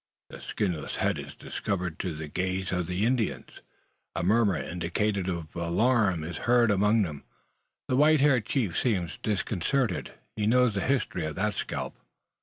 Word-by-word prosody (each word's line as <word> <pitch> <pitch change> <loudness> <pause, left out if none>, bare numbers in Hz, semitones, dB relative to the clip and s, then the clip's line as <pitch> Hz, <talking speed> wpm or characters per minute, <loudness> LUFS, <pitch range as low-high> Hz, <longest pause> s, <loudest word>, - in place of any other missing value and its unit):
The - - -9
skinless 90 -8 -2
head - - 0
is - - -8
discovered 90 -3 -3
to 90 -4 -3
the 80 0 -6
gaze 95 +4 -2
of 90 -2 -1
the 90 +4 0
Indians. 120 -2 -1 0.5
A - - -1
murmur, 105 -1 +3
indicative 90 +6 -1
of 85 -3 -5
alarm, 95 +1 +2
is 85 +1 -5
heard 120 -2 +5
among 105 +2 +3
them. 75 -6 -5 0.6
The 125 - +1
white 150 +3 +5
haired 130 -7 +3
chief 110 - 0
seems 95 -9 -1
disconcerted. 105 +2 -1 0.2
He 105 -1 0
knows 125 0 +4
the 100 - -1
history 115 - 0
of 75 - -5
that 105 +2 0
scalp! - - -4
100 Hz, 160 wpm, -28 LUFS, 85-115 Hz, 0.6 s, heard